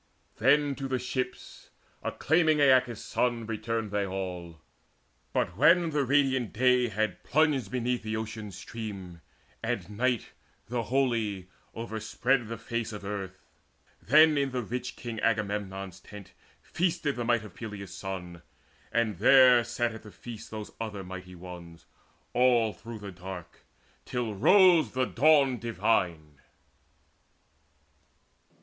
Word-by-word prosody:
Then 140 Hz, +4 st, +3 dB
to 135 Hz, -, -4 dB
the 130 Hz, -1 st, 0 dB
ships, 125 Hz, 0 st, -5 dB, 0.3 s
acclaiming 160 Hz, -1 st, +2 dB
Aeacus' 130 Hz, -5 st, +3 dB
son, 120 Hz, -2 st, 0 dB
Returned 115 Hz, -1 st, -3 dB
they 105 Hz, 0 st, 0 dB
all. 90 Hz, -4 st, -5 dB, 0.7 s
But 85 Hz, -, -1 dB
when 165 Hz, -, +5 dB
the 145 Hz, -2 st, +1 dB
radiant 130 Hz, -3 st, +2 dB
day 125 Hz, +1 st, +3 dB
Had 110 Hz, 0 st, -2 dB
plunged 150 Hz, -2 st, +2 dB
beneath 125 Hz, 0 st, -1 dB
the 110 Hz, 0 st, -3 dB
Ocean 110 Hz, -1 st, -5 dB
stream, 95 Hz, -3 st, -8 dB, 0.4 s
and -, -, -2 dB
night, 120 Hz, +3 st, -1 dB, 0.4 s
The 120 Hz, 0 st, -1 dB
holy, 115 Hz, -8 st, 0 dB, 0.3 s
overspread 115 Hz, +2 st, -1 dB
the 115 Hz, +1 st, -5 dB
face 115 Hz, 0 st, -3 dB
of 105 Hz, -2 st, -8 dB
earth, 95 Hz, -2 st, -5 dB, 0.6 s
Then 155 Hz, +2 st, +6 dB
in 140 Hz, -1 st, +1 dB
the 125 Hz, -1 st, -3 dB
rich 125 Hz, +3 st, -5 dB
king 115 Hz, -2 st, -6 dB
Agamemnon's 100 Hz, -4 st, -2 dB
tent 100 Hz, -2 st, -12 dB, 0.3 s
Feasted 170 Hz, -5 st, -1 dB
the 120 Hz, -, -3 dB
might 120 Hz, -2 st, +1 dB
of 100 Hz, -, -12 dB
Peleus' 100 Hz, -3 st, -8 dB
son, 90 Hz, -3 st, -6 dB, 0.5 s
and 110 Hz, -6 st, 0 dB
there 125 Hz, +1 st, +7 dB
Sat 120 Hz, 0 st, -1 dB
at 110 Hz, -, -9 dB
the 105 Hz, -, -12 dB
feast 115 Hz, +1 st, -10 dB
those 110 Hz, -1 st, -7 dB
other 105 Hz, -3 st, -4 dB
mighty 90 Hz, 0 st, -9 dB
ones 85 Hz, -2 st, -11 dB, 0.5 s
All 120 Hz, -3 st, +3 dB
through 115 Hz, -1 st, -9 dB
the 100 Hz, -2 st, -8 dB
dark, 90 Hz, -1 st, -9 dB, 0.4 s
till 120 Hz, -3 st, -2 dB
rose 180 Hz, -, +5 dB
the 130 Hz, 0 st, +1 dB
dawn 140 Hz, -1 st, +4 dB
divine. 90 Hz, -10 st, -1 dB
115 Hz, 130 wpm, -29 LUFS, 100-130 Hz, 0.7 s, there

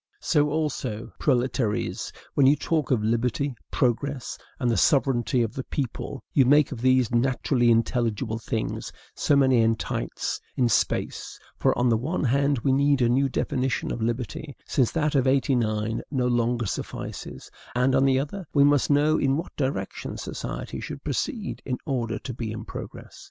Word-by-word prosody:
So 150 Hz, -2 st, +2 dB
also, 135 Hz, -7 st, -2 dB
proletaires, 120 Hz, -4 st, 0 dB, 0.2 s
when 140 Hz, -2 st, +4 dB
you 140 Hz, -, +6 dB
talk 155 Hz, 0 st, -1 dB
of 120 Hz, -6 st, +2 dB
LIBERTY, 120 Hz, +5 st, 0 dB, 0.2 s
PROGRESS, 130 Hz, +1 st, -1 dB, 0.2 s
and 125 Hz, -3 st, +1 dB
THE -, -, +1 dB
SOVEREIGNTY 125 Hz, -3 st, +2 dB
OF 115 Hz, -, -3 dB
THE 130 Hz, -, -4 dB
PEOPLE, 135 Hz, 0 st, -4 dB
you 135 Hz, -, +5 dB
make 145 Hz, +3 st, +4 dB
of 125 Hz, -5 st, -6 dB
these 130 Hz, -2 st, +3 dB
naturally 125 Hz, 0 st, +2 dB
intelligible 115 Hz, -1 st, +1 dB
things 110 Hz, 0 st, -3 dB, 0.2 s
so 145 Hz, -, +2 dB
many 130 Hz, -4 st, +4 dB
entites 110 Hz, -, -2 dB, 0.2 s
in 125 Hz, -2 st, +3 dB
space: 105 Hz, -, -1 dB, 0.2 s
for, -, -, +2 dB
on 125 Hz, -, +2 dB
the 115 Hz, -, +3 dB
one 155 Hz, +11 st, -2 dB
hand, 140 Hz, +2 st, +2 dB
we 135 Hz, -, +3 dB
need 140 Hz, -1 st, +3 dB
a 120 Hz, -, +3 dB
new 135 Hz, +3 st, +2 dB
definition 130 Hz, -1 st, -1 dB
of 115 Hz, -, -4 dB
liberty, 120 Hz, +5 st, -3 dB
since 130 Hz, -4 st, +1 dB
that 150 Hz, -2 st, +1 dB
of 135 Hz, -2 st, +2 dB
'89 115 Hz, -5 st, +1 dB
no 130 Hz, -3 st, 0 dB
longer 120 Hz, -1 st, +1 dB
suffices; -, -, -6 dB, 0.2 s
and, 125 Hz, +2 st, +3 dB
on 130 Hz, 0 st, +4 dB
the 135 Hz, -1 st, +4 dB
other, 160 Hz, +6 st, -5 dB
we 140 Hz, -, +6 dB
must 145 Hz, -1 st, +3 dB
know 150 Hz, +2 st, +3 dB
in 135 Hz, 0 st, +2 dB
what 165 Hz, -, -6 dB
direction 135 Hz, -1 st, -3 dB
society -, -, -5 dB
should -, -, -7 dB
proceed 215 Hz, -5 st, -3 dB
in 125 Hz, -2 st, -2 dB
order 120 Hz, -6 st, -1 dB
to 125 Hz, -, -6 dB
be 115 Hz, -2 st, -4 dB
in 110 Hz, -, -6 dB
progress. -, -, -9 dB
130 Hz, 165 wpm, -25 LUFS, 120-140 Hz, 0.2 s, you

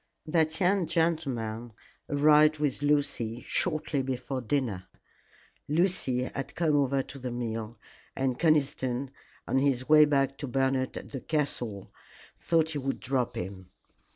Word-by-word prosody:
That 160 Hz, 0 st, +1 dB
young 185 Hz, -1 st, +2 dB
gentleman 135 Hz, -9 st, -1 dB, 0.4 s
arrived 150 Hz, +1 st, +5 dB
with 145 Hz, -2 st, -1 dB
Lucy 140 Hz, -5 st, 0 dB
shortly 155 Hz, -4 st, 0 dB
before 130 Hz, 0 st, -3 dB
dinner. 115 Hz, -7 st, -2 dB, 0.8 s
Lucy 150 Hz, -6 st, +1 dB
had 135 Hz, +1 st, -5 dB
come 160 Hz, -3 st, +2 dB
over 140 Hz, -1 st, +2 dB
to 135 Hz, +1 st, -10 dB
the 125 Hz, -1 st, -4 dB
meal, 115 Hz, -2 st, -4 dB, 0.4 s
and 130 Hz, -2 st, -1 dB
Conniston, 140 Hz, -5 st, +1 dB, 0.4 s
on 130 Hz, -, +2 dB
his 135 Hz, -2 st, +1 dB
way 150 Hz, 0 st, +8 dB
back 135 Hz, -2 st, +1 dB
to 140 Hz, -, -4 dB
Bernard 130 Hz, 0 st, 0 dB
at -, -, -9 dB
the 135 Hz, -, -5 dB
castle, 125 Hz, -10 st, -3 dB, 0.5 s
thought 160 Hz, -1 st, +1 dB
he 150 Hz, -, -3 dB
would 135 Hz, 0 st, -2 dB
drop 130 Hz, -3 st, -1 dB
in. 95 Hz, 0 st, -6 dB
135 Hz, 135 wpm, -29 LUFS, 125-150 Hz, 0.8 s, way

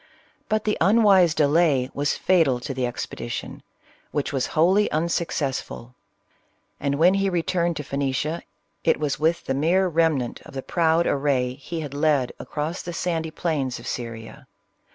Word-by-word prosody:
But 215 Hz, 0 st, +1 dB
the 210 Hz, -, -1 dB
unwise 195 Hz, -4 st, +5 dB
delay 145 Hz, -3 st, +3 dB
was 145 Hz, 0 st, 0 dB
fatal 160 Hz, -9 st, +3 dB
to 135 Hz, -, -4 dB
the 130 Hz, -1 st, -1 dB
expedition, 120 Hz, -, -6 dB, 0.5 s
which 145 Hz, -1 st, -2 dB
was 130 Hz, -2 st, 0 dB
wholly 190 Hz, +6 st, +4 dB
unsuccessful; 150 Hz, -6 st, -2 dB, 0.9 s
and 140 Hz, 0 st, 0 dB
when 170 Hz, +5 st, +5 dB
he 195 Hz, 0 st, +1 dB
returned 170 Hz, -1 st, 0 dB
to 150 Hz, -, -4 dB
Phoenicia, 140 Hz, +3 st, -2 dB, 0.4 s
it -, -, +2 dB
was 150 Hz, -3 st, -1 dB
with 165 Hz, +2 st, +1 dB
the 135 Hz, -, -1 dB
mere 170 Hz, +7 st, +2 dB
remnant 160 Hz, -7 st, 0 dB
of -, -, -13 dB
the 135 Hz, -, -4 dB
proud 165 Hz, 0 st, +2 dB
array 135 Hz, -3 st, +1 dB
he 155 Hz, +5 st, -6 dB
had 145 Hz, -3 st, -6 dB
led 145 Hz, -3 st, +1 dB
across 155 Hz, +4 st, -4 dB
the 175 Hz, -, -6 dB
sandy 165 Hz, -2 st, -2 dB
plains 150 Hz, -6 st, -2 dB
of -, -, -11 dB
Syria. 115 Hz, +3 st, -6 dB
155 Hz, 155 wpm, -24 LUFS, 135-170 Hz, 0.9 s, unwise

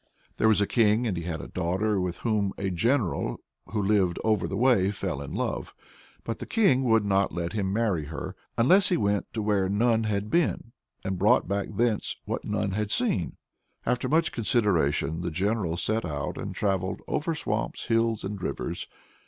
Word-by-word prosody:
There 110 Hz, -, +3 dB
was 110 Hz, -2 st, +4 dB
a -, -, +4 dB
king, 110 Hz, +1 st, +3 dB
and 105 Hz, -6 st, 0 dB
he 85 Hz, -1 st, -4 dB
had 80 Hz, -2 st, -3 dB
a -, -, -8 dB
daughter 95 Hz, +3 st, 0 dB
with 90 Hz, -1 st, -2 dB
whom 105 Hz, -4 st, +1 dB
a 95 Hz, -1 st, -2 dB
general 115 Hz, +3 st, 0 dB, 0.3 s
who 105 Hz, +3 st, -3 dB
lived 95 Hz, -4 st, +2 dB
over 110 Hz, -4 st, +1 dB
the 95 Hz, -, -3 dB
way 115 Hz, -6 st, +4 dB
fell 95 Hz, -7 st, -3 dB
in 70 Hz, -, -6 dB
love. -, -, -3 dB, 0.5 s
But 115 Hz, -, -4 dB
the -, -, -6 dB
king 190 Hz, -, +3 dB
would 115 Hz, -3 st, +3 dB
not 100 Hz, -1 st, +2 dB
let 85 Hz, +1 st, -3 dB
him 100 Hz, -3 st, -1 dB
marry 100 Hz, -8 st, 0 dB
her 85 Hz, +6 st, -6 dB, 0.2 s
unless 180 Hz, +12 st, +5 dB
he 180 Hz, -, +2 dB
went 100 Hz, -1 st, 0 dB
where 105 Hz, -3 st, +1 dB
none 110 Hz, +2 st, +2 dB
had 105 Hz, 0 st, -2 dB
been, 165 Hz, -8 st, +1 dB, 0.3 s
and 95 Hz, -2 st, -2 dB
brought -, -, +4 dB
back 100 Hz, +1 st, -1 dB
thence 115 Hz, -1 st, +1 dB
what -, -, -3 dB
none 100 Hz, -, -1 dB
had 105 Hz, +1 st, -2 dB
seen. -, -, +2 dB, 0.5 s
After 125 Hz, +1 st, 0 dB
much 160 Hz, +2 st, +2 dB
consideration 90 Hz, -, +1 dB
the 85 Hz, -, -2 dB
general 95 Hz, 0 st, -1 dB
set 110 Hz, +5 st, 0 dB
out 75 Hz, -5 st, -3 dB
and -, -, -5 dB
travelled 95 Hz, -2 st, -1 dB
"over 160 Hz, +2 st, -1 dB
swamps, 115 Hz, -7 st, -3 dB
hill, 115 Hz, -1 st, +2 dB
and 100 Hz, 0 st, -5 dB
rivers." -, -, -4 dB
105 Hz, 185 wpm, -27 LUFS, 95-115 Hz, 0.5 s, unless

